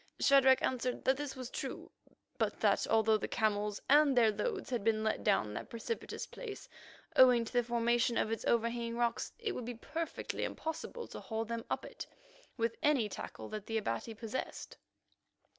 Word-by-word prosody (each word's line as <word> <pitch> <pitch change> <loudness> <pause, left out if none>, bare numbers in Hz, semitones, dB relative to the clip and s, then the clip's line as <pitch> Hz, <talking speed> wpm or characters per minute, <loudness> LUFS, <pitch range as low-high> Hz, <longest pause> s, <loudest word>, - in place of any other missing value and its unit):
Shadrach 265 -1 +6
answered 250 -1 -1
that 265 - +4
this 285 -1 -5
was 255 -1 -7
true, - - -5 0.5
but - - 0
that - - +3
although 220 -1 +4
the - - -3
camels 210 -2 0
and 285 -2 +5
their 225 -3 +6
loads 400 - -3
had 240 -5 -1
been 215 0 +2
let 220 - 0
down 150 - +2
that - - -6
precipitous 235 - -4
place, 435 -5 -8 0.5
owing 250 -2 +7
to - - -9
the 245 - +4
formation 235 0 +1
of 220 - +1
its 225 - -2
overhanging 235 0 0
rocks, 235 -1 0
it 460 -3 -2
would 250 - -5
be 245 0 -5
perfectly 320 +8 -4
impossible 325 +9 -4
to - - -7
haul 225 0 -3
them 230 0 -4
up - - -2
it - - -8 0.5
with 230 -1 0
any 285 -7 +3
tackle - - -7
that 215 -2 -6
the 225 - -1
Abati 215 - -3
possessed. 225 +3 -5
235 Hz, 175 wpm, -34 LUFS, 220-265 Hz, 0.5 s, owing